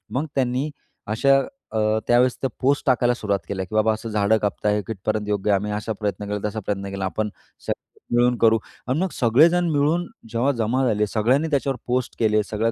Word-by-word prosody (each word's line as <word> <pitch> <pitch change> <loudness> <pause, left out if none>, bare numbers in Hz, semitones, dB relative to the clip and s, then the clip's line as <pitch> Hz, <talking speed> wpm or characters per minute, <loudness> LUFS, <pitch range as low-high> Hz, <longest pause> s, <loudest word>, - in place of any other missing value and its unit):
मग 140 +4 0
त्यांनी, 130 +2 0 0.4
अशा 135 +6 +3 0.7
त्यावेळेस, 125 +1 +3
त्या 135 - 0
पोस्ट 140 +2 +2
टाकायला 125 -1 +3
सुरुवात 100 -4 -1
केल्या 95 -2 -3
की 100 - -8
बाबा 110 0 +3
असं 110 +1 -6
झाडं 105 +1 +2
कापत 105 0 -2
आहे, 105 0 +2
कितपर्यंत 110 0 -2
योग्य 105 0 +1
आहे? - - +5
आम्ही 105 +1 -4
असा 105 +1 -3
प्रयत्न 105 0 -2
केला, 105 0 -2
तसा 110 +1 -4
प्रयत्न 100 -1 -2
केला, 100 -1 -3
आपण 105 +3 -2 0.4
सगळे - - -7
मिळून 120 0 +4
करू 115 0 +4 0.3
आणि 130 +5 0
मग 190 0 0
सगळेजण 165 +10 +4
मिळून 155 +4 +2 0.3
जेव्हा 120 +5 +2
जमा 125 +4 +1
झाले, 105 -1 +1
सगळ्यांनी 125 +10 +1
त्याच्यावर 135 -2 0
पोस्ट 125 0 -1
केले, 110 -1 +3
सगळं 110 +2 -1
115 Hz, 195 wpm, -23 LUFS, 105-130 Hz, 0.7 s, आहे